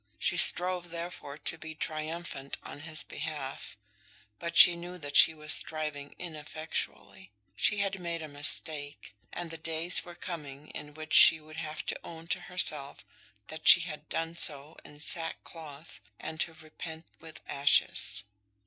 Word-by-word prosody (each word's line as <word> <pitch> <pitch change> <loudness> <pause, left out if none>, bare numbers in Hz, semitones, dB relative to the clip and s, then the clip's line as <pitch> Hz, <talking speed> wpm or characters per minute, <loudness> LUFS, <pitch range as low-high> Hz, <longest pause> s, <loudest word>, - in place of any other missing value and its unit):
She - - +1
strove, 180 0 +6
therefore, 170 -4 -7
to 165 - -2
be 160 -1 -8
triumphant 155 -2 -5
on - - -9
his 155 0 -1
behalf, 145 -8 -6 0.6
but 170 0 -4
she 175 - +10
knew 175 +1 -8
that 145 -4 -8
she 160 - +8
was 155 0 0
striving 150 -2 -3
ineffectually. 155 - -6 0.3
She 200 - +1
had 195 -1 -2
made 170 -2 -4
a - - -6
mistake, 145 -2 -3 0.2
and 175 -1 -6
the 165 - -6
days 165 +2 -1
were 175 -1 -11
coming 150 -4 -8
in 150 0 -9
which 155 -1 -8
she 160 - +10
would 155 +1 -14
have 155 -1 -5
to - - -2
own 165 -1 -10
to - - +1
herself 150 -6 -3 0.4
that 155 0 -6
she - - +10
had 155 -3 -7
done 165 +1 -3
so 150 -2 -1
in 145 - -15
sackcloth, 160 -2 -6 0.2
and 160 0 -7
to 165 0 -1
repent 160 +1 -10
with 160 -1 -12
ashes. 110 -7 +2
160 Hz, 155 wpm, -30 LUFS, 150-170 Hz, 0.6 s, she